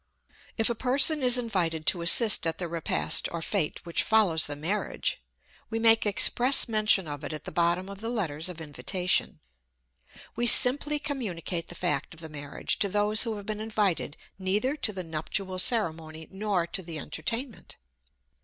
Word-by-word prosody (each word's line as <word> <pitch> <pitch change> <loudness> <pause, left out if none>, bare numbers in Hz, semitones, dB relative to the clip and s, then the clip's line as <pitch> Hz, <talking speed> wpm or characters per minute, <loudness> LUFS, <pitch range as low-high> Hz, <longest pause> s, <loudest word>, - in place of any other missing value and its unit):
If 225 - +3
a 235 - 0
person 270 +6 +3
is 250 -1 +5
invited 175 -10 -2
to 175 - +2
assist 205 +3 +6
at 165 0 -3
the 175 - -4
repast 155 - -1
or 170 - -5
fête 165 -1 -2
which 170 -1 0
follows 200 -8 +2
the 145 - -6
marriage, 205 - -4 0.5
we 225 - -4
make 225 -1 +3
express 245 +7 +4
mention 215 -5 +2
of 145 0 -8
it 145 - -6
at 155 -1 -8
the - - -8
bottom 175 +2 -1
of 200 0 -11
the 225 - -5
letters 170 -8 -3
of 175 -2 -9
invitation. 180 +4 -2 0.9
We 240 +1 0
simply 285 +5 +6
communicate 200 - -5
the 175 - -11
fact 165 -3 -3
of - - -13
the 160 -1 -10
marriage 145 -1 -4
to 200 - +1
those 210 +2 +1
who 225 -2 -4
have 205 -1 -10
been 215 0 -5
invited 210 -8 -2 0.2
neither 210 +9 -1
to 255 -7 +1
the 190 -3 -6
nuptial 185 +4 -4
ceremony, 160 -8 -1
nor 195 -3 -2
to 190 - -5
the 165 -3 -7
entertainment. 235 - -6
190 Hz, 175 wpm, -26 LUFS, 165-225 Hz, 0.9 s, assist